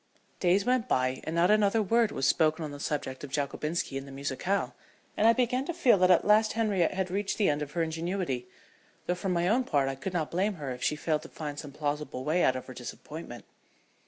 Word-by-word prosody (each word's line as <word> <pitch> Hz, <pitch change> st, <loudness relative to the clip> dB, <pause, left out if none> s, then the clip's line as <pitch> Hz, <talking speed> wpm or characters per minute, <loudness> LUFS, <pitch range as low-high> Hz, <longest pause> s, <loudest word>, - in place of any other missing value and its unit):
Days 190 Hz, +2 st, +3 dB
went 250 Hz, -1 st, +1 dB
by 130 Hz, -, 0 dB
and 160 Hz, -, -3 dB
not 175 Hz, +3 st, +4 dB
another 215 Hz, +1 st, +3 dB
word 225 Hz, +2 st, +2 dB
was 135 Hz, -, -1 dB
spoken 160 Hz, +1 st, +2 dB
on 150 Hz, -, -6 dB
the 145 Hz, -, -8 dB
subject 135 Hz, -3 st, -3 dB
of 145 Hz, -, -6 dB
Jockobinski 145 Hz, +1 st, -2 dB
and 135 Hz, -, -10 dB
the -, -, -10 dB
musicale, 140 Hz, +8 st, -2 dB, 0.4 s
and 220 Hz, -, +3 dB
I 230 Hz, -, +7 dB
began 250 Hz, +1 st, +1 dB
to 345 Hz, -, -4 dB
feel 250 Hz, -, +4 dB
that 185 Hz, 0 st, +4 dB
at 180 Hz, -, +5 dB
last 215 Hz, +1 st, +4 dB
Henriette 205 Hz, -7 st, +1 dB
had 190 Hz, -1 st, -2 dB
reached 200 Hz, +1 st, -1 dB
the 210 Hz, -, +3 dB
end 145 Hz, 0 st, -2 dB
of 150 Hz, 0 st, -5 dB
her 170 Hz, -, +1 dB
ingenuity 165 Hz, -5 st, -2 dB, 0.6 s
though 180 Hz, -, +1 dB
for 180 Hz, +2 st, -3 dB
my 175 Hz, -1 st, +1 dB
own 235 Hz, +6 st, +3 dB
part 145 Hz, -, +1 dB
I -, -, -2 dB
could 175 Hz, +8 st, -5 dB
not 160 Hz, -4 st, -1 dB
blame 195 Hz, +4 st, 0 dB
her 145 Hz, -5 st, -5 dB
if 125 Hz, 0 st, -7 dB
she 150 Hz, -, +1 dB
failed 155 Hz, 0 st, -1 dB
to 165 Hz, -, -11 dB
find 145 Hz, -2 st, -6 dB
some 145 Hz, -3 st, -8 dB
plausible 145 Hz, -2 st, -3 dB
way 170 Hz, +4 st, +2 dB
out 130 Hz, -, +3 dB
of 130 Hz, -, -5 dB
her 130 Hz, -, -9 dB
disappointment. 125 Hz, +1 st, -8 dB
165 Hz, 235 wpm, -29 LUFS, 145-200 Hz, 0.6 s, I